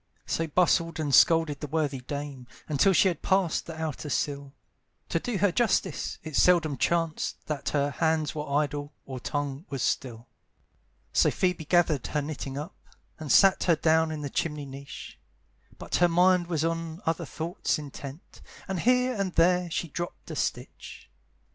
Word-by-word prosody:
So 165 - -1
bustled 165 0 +2
and 145 -3 -1
scolded 160 -3 +5
the 150 - -5
worthy 145 -2 -1
dame, 140 -1 -6 0.2
Until 155 +6 +3
she 190 +2 +5
had 175 - -1
passed 190 -4 +1
the 160 -1 -7
outer 155 -1 -4
sill, 140 0 -2 0.6
To - - +1
do 245 -5 -3
her 200 0 +3
justice, 235 +4 0
it 155 -2 -6
seldom 165 -4 +4
chanced 165 +3 -1
That 150 -2 -3
her 145 -1 0
hands 160 +1 0
were 150 -1 -5
idle, 145 0 -1
or 130 -2 -6
tongue 145 +4 -4
was 135 -3 -3
still. 120 -3 -2 0.9
So - - +4
Phoebe 180 -4 -1
gathered 160 -5 +2
her 150 - -1
knitting 140 -2 -5
up, 150 +3 -6 0.4
And 155 -2 -4
sat 195 -1 +5
her 170 - +4
down 160 +1 +3
in 155 -1 -4
the 140 -2 -5
chimney 150 -3 -2
niche; 135 0 -10 0.6
But - - -2
her 175 0 +4
mind 180 +1 +4
was 165 -2 0
on 165 +1 -3
other 165 -1 -1
thoughts 160 -2 -2
intent, 145 +1 -9 0.3
And 190 -2 -2
here 250 +4 +3
and 195 -5 -2
there 180 +1 +3
she 170 - -2
dropped 175 +3 -6
a - - -5
stitch. - - -5
160 Hz, 165 wpm, -27 LUFS, 145-175 Hz, 0.9 s, scolded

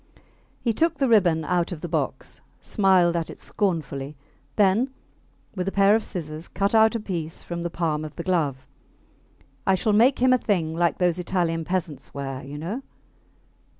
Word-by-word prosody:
He 230 - 0
took 330 +5 +1
the 275 - +2
ribbon 175 -9 +3
out 175 +1 0
of 165 -4 -6
the 175 - -4
box, 150 -5 -3 0.2
smiled 185 -4 +3
at 165 -1 -2
it - - -9
scornfully, 150 -7 -2 0.4
then 210 +6 +3 0.7
with 185 -1 -3
a - - 0
pair 200 +1 +5
of 220 0 +2
scissors 155 -3 -5
cut 200 +3 -1
out 220 +1 +5
a - - 0
piece 170 -6 -4
from 170 0 -5
the 175 - -2
palm 160 -3 -1
of 155 -1 -8
the 170 - -5
glove. 150 -8 0 1.0
I 190 - +5
shall 210 +3 +1
make 240 +6 +5
him 255 +1 +4
a 255 - +3
thing 170 -8 0
like 170 -3 +1
those 180 -1 +1
Italian 170 -2 -1
peasants 175 -6 -3
wear, 135 -1 -5
you 140 +2 -8
know. 185 - -4
175 Hz, 180 wpm, -24 LUFS, 160-200 Hz, 1.0 s, pair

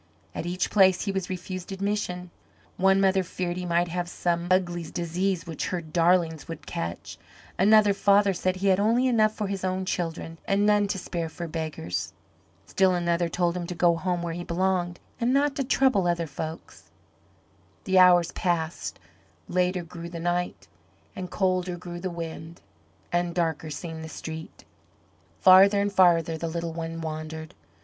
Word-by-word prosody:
At 170 - -4
each 180 +1 -1
place 190 -3 +5
he 200 - -1
was 190 -2 -3
refused 185 0 -6
admission. 190 -3 -3 0.4
One 195 +1 +4
mother 195 0 +3
feared 180 -1 -3
he 180 0 -4
might 170 +1 +2
have 175 +1 -3
some 175 -1 -1
ugly 175 -2 +1
disease 175 +1 -2
which 165 -3 -4
her 180 - -2
darlings 165 0 +1
would 165 -2 -8
catch; 85 +1 -5 0.4
another 210 +1 +6
father 200 0 +4
said 185 +1 -1
he 195 +1 0
had 190 0 +4
only 230 +5 +3
enough 215 -3 +3
for 210 - -2
his 195 -1 -4
own 185 0 -1
children 165 -2 -4
and 200 +1 +2
none 210 -1 +3
to 195 - -2
spare 170 -2 -4
for 170 +1 -6
beggars. 90 - -4 0.5
Still 190 -1 +2
another 170 -1 0
told 175 0 0
him 175 -1 -4
to 180 - -5
go 170 0 +3
home 175 0 -2
where 170 -1 -3
he 175 +1 -5
belonged, 175 0 -1 0.2
and 245 +2 +2
not 285 0 +2
to 275 - +1
trouble 255 -8 +2
other 170 -1 0
folks. 160 +2 -8 0.9
The 190 -4 +3
hours 175 -2 +6
passed; 170 -3 -2 0.5
later 180 0 0
grew 170 0 -8
the 170 -1 -7
night, 175 +1 -2 0.5
and 185 -1 -5
colder 185 -2 0
grew 175 0 -7
the 185 +1 -3
wind, 165 0 -7 0.5
and 175 0 0
darker 160 -2 -1
seemed 160 +2 -6
the 160 - -7
street. 160 0 -8 0.8
Farther 195 +2 +7
and 200 0 0
farther 165 -4 +4
the 165 - -2
little 170 0 -3
one 165 0 -5
wandered. 160 +1 -6
175 Hz, 170 wpm, -26 LUFS, 170-190 Hz, 0.9 s, Farther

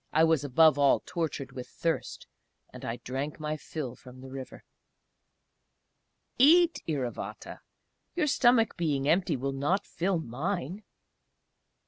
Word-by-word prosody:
I 160 - +4
was 160 -3 +3
above 145 +2 +4
all 140 -1 +5
tortured 155 -6 -3
with 125 -1 -7
thirst, 165 -5 -3 0.5
and - - -10
I 115 - -3
drank 135 +5 -4
my 155 0 -2
fill 145 -4 -6
from 125 0 -14
the 130 0 -10
river. 135 -1 -8 1.8
"Eat", 335 +5 +6
Iravata 135 -7 -4 0.6
"your 350 - +1
stomach 240 -5 +3
being 145 -5 0
empty 165 -2 +2
will 135 +2 -2
not 160 +9 0
fill 180 +2 -1
mine!" 165 - -3
155 Hz, 125 wpm, -29 LUFS, 135-180 Hz, 1.8 s, Eat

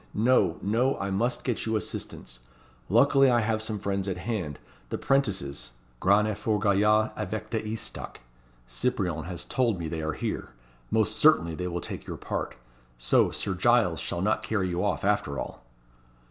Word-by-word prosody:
No! 105 -6 +3
no! 120 +7 +2
I 100 0 -3
must 115 +6 0
get 120 -3 -2
you 110 - +1
assistance. - - -5 0.5
Luckily 135 +5 +5
I 120 -1 +4
have 110 0 0
some 110 -1 -3
friends 100 -1 -2
at 90 - -2
hand, 90 - -3 0.3
the - - -2
'prentices 95 - 0 0.3
grands 100 +3 +4
et 105 - -5
forts 105 -2 0
gaillards, 105 +2 +4
avec 110 +1 -4
des 110 -2 0
estocs; 115 - -5 0.5
Cyprien 90 - -1
has 90 -1 -5
told 120 -6 +1
me 85 -2 -4
they 80 0 -3
are 80 0 -2
here. - - -4 0.4
Most - - +1
certainly 85 +1 +5
they 90 +3 -3
will 85 -1 -3
take - - -6
your - - -5
part. - - -4 0.4
So, - - +3
Sir - - -2
Giles - - +3
shall 85 - -3
not 105 +2 +1
carry 100 -4 -1
you 90 +1 -1
off, 100 -2 0
after 100 -9 +1
all." - - -6
100 Hz, 175 wpm, -27 LUFS, 90-110 Hz, 0.5 s, Luckily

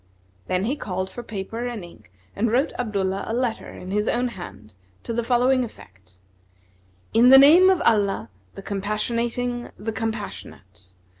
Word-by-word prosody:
Then 185 +1 0
he 250 +7 0
called 190 -8 -4
for 240 - -7
paper 225 +2 -5
and 235 -6 -5
ink 105 - -17 0.2
and 225 +3 +1
wrote 260 +5 +1
Abdullah 195 -4 -1
a 225 - -2
letter 245 -2 -2
in 185 - -9
his 210 +2 0
own 245 +1 +1
hand, 110 - -10 0.3
to 230 - -4
the 235 +1 -1
following 250 +2 +2
effect: 95 - -13 1.0
"In 235 +3 +6
the 265 - +10
name 325 +7 +8
of 375 -2 +2
Allah, 200 - +1 0.2
the 195 - -9
Compassionating' 235 +5 -2
the 225 - -4
Compassionate! 210 - -7
225 Hz, 155 wpm, -23 LUFS, 190-245 Hz, 1.0 s, the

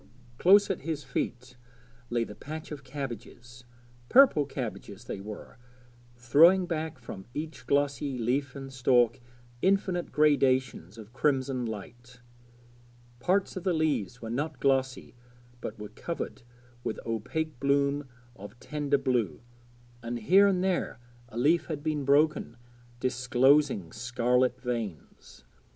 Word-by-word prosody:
Close 200 +2 +6
at 190 - -3
his 150 0 -3
feet 125 -1 -4 0.5
lay 120 -1 +1
the 105 - -8
patch 155 +10 -8
of 145 -2 -7
cabbages 120 -2 -8 0.4
purple 250 - +6
cabbages 110 -5 -6
they 115 - -6
were, 105 +3 -9 0.6
throwing 160 +10 +5
back 160 -3 -3
from 100 -6 -9
each 150 -5 -6
glossy 140 -1 0
leaf 125 +3 -1
and 135 -1 -8
stalk 125 -2 +3 0.4
infinite 190 -2 +1
gradations 130 - +2
of 110 +1 -12
crimson 135 -3 0
light. 120 +3 -9 1.0
Parts 190 +8 +1
of 185 - -5
the 185 -2 +1
leaves 125 - -1
were 115 - -5
not 145 +2 -3
glossy 135 -1 0 0.5
but - - -6
were 105 -1 -8
covered 165 +10 -6 0.4
with 110 - -3
opaque 120 +6 -3
bloom 140 +1 +1 0.3
of 105 +3 -11
tender 145 -1 0
blue, 125 - -1 0.6
and 120 +1 -4
here 185 - +5
and 185 -2 +1
there 185 -10 -1 0.3
a 115 - -9
leaf 155 +8 +3
had 150 -3 -5
been 150 -3 -1
broken, 145 -4 +2 0.4
disclosing 125 - +2
scarlet 125 +2 +1
veins. 115 - -6
130 Hz, 125 wpm, -29 LUFS, 120-150 Hz, 1.0 s, Close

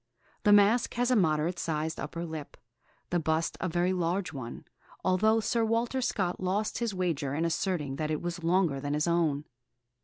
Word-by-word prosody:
The 210 - +4
mask 205 +4 +5
has 245 +1 +1
a - - +5
moderate 170 -2 +2
sized 160 0 -2
upper 170 +3 -4
lip, 160 -3 -7 0.5
the 175 - +2
bust 160 +1 0
a 185 - 0
very 175 +2 +1
large 180 0 -1
one, 130 -4 -7 0.4
although 215 +5 +3
Sir 230 +1 +1
Walter 230 +3 0
Scott 190 -7 -1
lost 195 +4 -1
his 230 -4 -1
wager 155 -7 -1
in 165 +2 0
asserting 160 -5 -1
that 155 0 -2
it 155 -1 0
was 175 -1 -4
longer 170 -4 +2
than 145 +1 -1
his 150 +3 0
own. 160 -4 +1
175 Hz, 180 wpm, -29 LUFS, 155-200 Hz, 0.5 s, mask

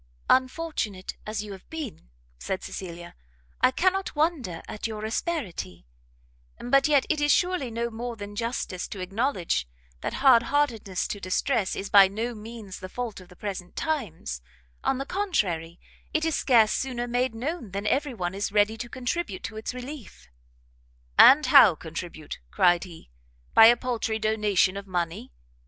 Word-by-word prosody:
"Unfortunate 255 - 0
as 215 -1 -3
you 210 - -8
have 190 -1 -11
been," 290 - -7 0.3
said 190 - -3
Cecilia, 175 -2 -7 0.5
"I - - +6
cannot 375 +7 0
wonder 295 - -1
at 215 - -4
your 215 -1 -5
asperity; 220 - -3 0.7
but 275 +3 +3
yet, 285 -3 +4
it 305 -2 0
is 295 0 +3
surely 355 -7 +1
no 235 +1 -3
more 235 +1 -5
than 205 -1 -8
justice 230 -5 -3
to 200 - -8
acknowledge, 185 - -1 0.3
that - - -4
hard 260 -4 +6
heartedness 230 -10 0
to 205 - -4
distress 195 +3 0
is 195 - -5
by 200 -2 +9
no 225 +5 -3
means 215 -3 -9
the 185 - -8
fault 235 -3 -5
of 180 - -15
the 180 - -15
present 190 -2 -6
times: 190 - -3 0.4
on 265 - +1
the 275 - -3
contrary, 185 - -1 0.4
it 315 +1 +2
is 325 - +1
scarce 230 -5 +4
sooner 245 -2 -2
made 245 0 0
known, 265 - -4
than 200 +2 -4
every 270 +3 0
one 180 -3 -3
is 200 +1 -2
ready 210 +2 +2
to 240 +2 -6
contribute 255 - -3
to 225 - -6
its 220 - -4
relief." 250 - -9 0.9
"And 295 +3 +9
how 230 - +8
contribute?" 160 -1 -7
cried 175 - +3
he, 165 - -13 0.4
"by 225 - +9
a 240 +1 +6
paltry 235 -3 -2
donation 210 -3 +2
of 200 0 -7
money? 170 - -3
220 Hz, 160 wpm, -26 LUFS, 185-265 Hz, 0.9 s, by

